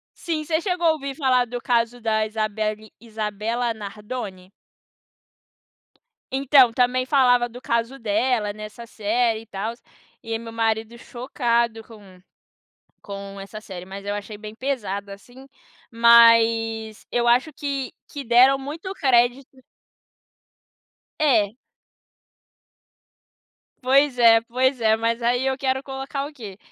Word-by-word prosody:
Sim, 320 -3 -3
você 315 +1 -1
chegou 355 -2 0
a - - +6
ouvir 275 -3 -6
falar 255 -4 +2
do 245 +1 -5
caso 240 0 0
da 220 -1 +1
Isabelly 215 0 -3
Isabella 225 +2 -3
Nardone? 205 -2 -8 1.8
Então, 270 -2 +5
também 250 +1 +1
falava 250 -3 +3
do 245 +2 -11
caso 235 +2 -1
dela 220 0 0
nessa 215 +2 -9
série 225 +1 0
e - - -15
tals, 225 +3 -5 0.4
e 225 - -8
aí 225 - -2
meu 230 0 -9
marido 225 0 -1
chocado 235 -2 -1
com 200 -5 -16 0.8
com 200 -1 -8
essa 200 +2 -9
série, 185 -4 -9
mas 195 +1 -9
eu 205 - -2
achei 205 +1 -7
bem 215 0 -9
pesado, 210 -6 -4
assim, 245 +7 -13 0.4
mas 230 -1 +4
eu 240 0 +1
acho 250 +6 +3
que 275 -2 -4 0.2
que 285 -1 -7
deram 255 +3 +5
muito 305 +7 -7
crédito. 260 -2 +1 1.6
É. 225 -9 +3 2.3
Pois 270 +1 +3
é, 225 -1 +7
pois 255 +3 0
é 220 -1 +4
mas 230 +1 -1
aí 245 +2 +1
eu 265 0 0
quero 265 -1 -1
colocar 270 +1 -5
o 305 - -14
quê? 210 -9 -10
235 Hz, 130 wpm, -23 LUFS, 215-260 Hz, 2.3 s, é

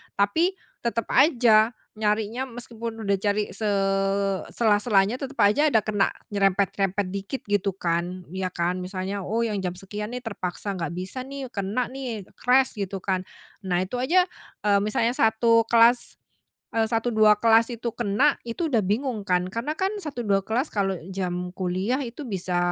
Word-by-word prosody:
Tapi 325 - +2 0.3
tetap 230 -1 -2
aja 235 -6 +5 0.2
nyarinya 220 +4 -1
meskipun 230 -2 -7
udah 200 -1 +1
cari 205 +1 0
se 215 - -3 0.9
sela-selanya, 210 0 +3
tetap 275 0 -6
aja 260 +10 +4
ada 225 -8 +3
kena 205 -2 +2 0.2
nyerempet-nyerempet 195 0 +1
dikit 200 +7 -4
gitu 205 -2 0
kan. 175 0 -2
Ya 190 0 -2
kan. 180 0 -1
Misalnya, 185 +2 -4
"Oh 225 +5 -1
yang 215 -3 -1
jam 180 -2 -3
sekian 210 +5 -6
nih 250 - -6
terpaksa 200 -2 -4
nggak 170 -3 -4
bisa 185 +7 -5
nih, 275 -2 -7
kena 210 +5 -2
nih, 250 -6 -5 0.2
crash," 255 -2 +3
gitu 195 -1 -4
kan. 185 -1 -1 0.3
Nah, 180 -2 0
itu 220 +7 -4
aja, 340 +9 +4 0.4
eee, 205 -1 +4
misalnya 215 +3 +1
1 230 -1 +3
kelas, 235 +1 +4 0.6
eee, 225 -1 +3
1, 225 +1 0
2 215 -1 +6
kelas 225 +1 +5
itu 235 0 -5
kena, 240 +6 +2
itu 235 +8 -3
udah 240 -7 +2
bingung 220 +4 -1
kan. 180 -2 +1
Karena 230 +9 -3
kan 385 +2 0
1, 280 -6 -4
2 195 -1 +3
kelas 240 +8 0
kalau 195 -2 0 0.2
jam 180 -1 -3
kuliah 190 +8 -1
itu 245 +4 -7
bisa, 185 -4 -2
210 Hz, 160 wpm, -25 LUFS, 195-240 Hz, 0.9 s, 2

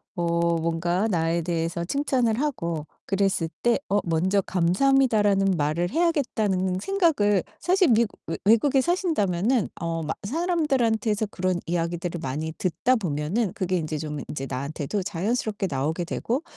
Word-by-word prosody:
어 170 -1 +1
뭔가 170 +5 0
나에 170 -3 +1
대해서 170 0 -2
칭찬을 250 -2 0
하고 170 - -2 0.2
그랬을 195 -4 +1
때 240 +1 +3
어 205 +1 +3
'먼저 180 +4 +1
감사합니다라는 200 +1 +3
말을 155 +4 0
해야겠다.'는 220 - +1
생각을 290 - +2 0.2
사실 365 -1 +3
미국 230 -2 +2
외 - - -3
외국에 260 +5 +4
사신다면은 250 - +1
어 165 -1 -2
막 155 - -3
사람들한테서 245 - +1
그런 185 -1 -1
이야기들을 170 0 -2
많이 155 +4 -3
듣다 185 +9 +1
보면은 180 +4 -1
그게 185 -4 -1
인제 155 -2 -3
좀 150 -1 -4
인제 135 -2 -4
나한테도 140 +8 -3
자연스럽게 205 +2 -1
나오게 150 +6 -1
되고 250 - -2
190 Hz, 335 characters per minute, -25 LUFS, 165-235 Hz, 0.2 s, 외국에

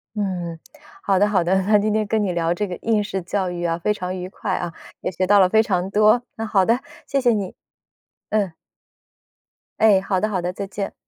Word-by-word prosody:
嗯， 180 -5 -3 0.4
好 195 -2 +2
的 205 +2 +4
好 195 -4 +2
的， 190 +3 +2
那 210 +2 +4
今 215 +1 0
天 215 0 +1
跟 220 +1 0
你 195 - 0
聊 170 0 +1
这 205 +3 -2
个 180 -2 -5
应 220 -2 +2
试 195 -1 -3
教 185 +1 -1
育 175 0 -5
啊， 165 0 -1
非 210 - 0
常 185 -1 -4
愉 180 0 -5
快 195 0 -4
啊， 175 - -3 0.3
也 - - -2
学 185 +2 -1
到 205 +2 +5
了 185 -1 +5
非 220 +2 +4
常 185 -3 -1
多， 215 +4 +4
那 225 - -4
好 195 -3 +2
的， 230 +4 +2 0.3
谢 275 - +1
谢 250 -2 +3
你， 200 -4 -3 0.8
嗯。 205 -3 +1 1.3
哎， 210 -3 +6
好 195 -1 0
的 215 +3 0
好 190 -4 -1
的， 180 +1 -3
再 200 +1 -4
见。 195 0 -5
195 Hz, 240 characters per minute, -22 LUFS, 180-210 Hz, 1.3 s, 哎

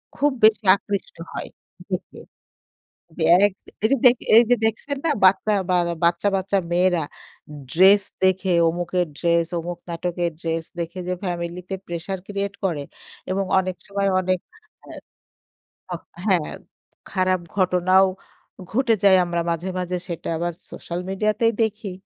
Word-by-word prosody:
খুব 290 +1 +2
বেশি 215 -1 +5
আকৃষ্ট 205 - -5 0.2
হয় - - -5 0.4
দেখে। - - -5 1.0
জী 160 - -1
আরেক 200 +1 +4 0.3
এইযে 250 0 +6 0.3
এইযে 240 +1 +6
দেখছেন 270 +6 -2
না - - +2 0.2
বাচ্চা 195 +3 +4 0.2
বা 180 - +3 0.3
বাচ্চা, 170 +3 +2
বাচ্চা 195 +1 0
মেয়েরা 175 -2 +2 0.7
ড্রেস 195 +3 +6 0.2
দেখে 190 0 +2 0.2
অমুকের 175 +1 -1
ড্রেস 170 -1 +2
অমুক 175 +1 -5
নাটকের 170 0 -2
ড্রেস 165 -1 -2
দেখে 170 +2 -4
যে, 180 - 0
ফ্যামিলিতে 175 +1 -4
pressure 175 +2 -4
create 200 0 -3
করে 155 -6 -1 0.5
এবং 195 +1 0 0.2
অনেক 185 -1 -3
সময় 200 0 0
অনেক 185 0 0 0.5
হ্যাঁ। - - -10 0.9
হ - - -7 0.3
হ্যাঁ, 185 -7 +1 0.6
খারাপ 185 -1 +1 0.2
ঘটনাও 185 0 +4 0.7
ঘটে 240 -1 +3
যায়। 190 -2 +7
আমরা 170 -1 -2
মাঝে, 170 +3 -2
মাঝে 180 0 -2
সেটা 170 - -5
আবার 175 +1 -2 0.2
সোশ্যাল 175 +1 -6
মিডিয়াতেই 215 +4 +1
দেখি, 215 -3 -2
185 Hz, 130 wpm, -22 LUFS, 175-200 Hz, 1.0 s, যায়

